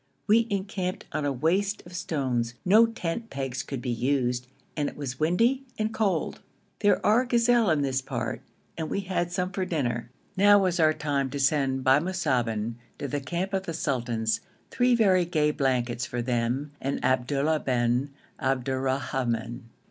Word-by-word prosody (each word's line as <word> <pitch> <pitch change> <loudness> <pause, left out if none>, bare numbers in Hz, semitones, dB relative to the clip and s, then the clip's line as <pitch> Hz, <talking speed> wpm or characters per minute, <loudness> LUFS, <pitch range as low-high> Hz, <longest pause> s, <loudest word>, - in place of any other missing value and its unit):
We 225 +2 +4
encamped 190 -2 -3
on 150 - -2
a 145 - +1
waste 185 - 0
of 175 - -12
stones; 130 -9 -1
no 215 +5 +6
tent 225 +1 -4
pegs 135 -4 -3
could 135 -3 -6
be 125 - -1
used, 125 0 0 0.3
and 145 -2 0
it - - -14
was 130 -3 -5
windy 230 - +2
and 220 +1 -1
cold. 195 -8 0 0.4
There 205 -1 +2
are 220 +4 +5
gazelle 240 -3 +3
in 155 -3 +2
this 135 -1 0
part - - -4 0.4
and 160 - -2
we 200 - -1
had 175 -2 -2
some 180 +1 -1
for 190 - -2
dinner. 120 -9 -2 0.3
Now 205 +1 +6
was 185 -3 +1
our 155 -1 +4
time 145 -3 -1
to 140 - -4
send 135 -2 +1
by 130 +2 +5
Musaben 125 - -1 0.2
to 145 - -4
the 145 +2 -2
camp 175 +8 -3
of 190 -1 -1
the 165 - -3
sultans 120 -7 -1 0.3
three 245 -1 +3
very 190 -6 +4
gay 155 -3 +1
blankets 125 -4 0
for 120 0 -3
them 125 +4 -1
and 135 +1 -2
Abdullah 140 +4 +1
bin 125 +1 +1 0.3
Abdurrahman. 130 -3 -1
145 Hz, 165 wpm, -27 LUFS, 130-185 Hz, 0.4 s, no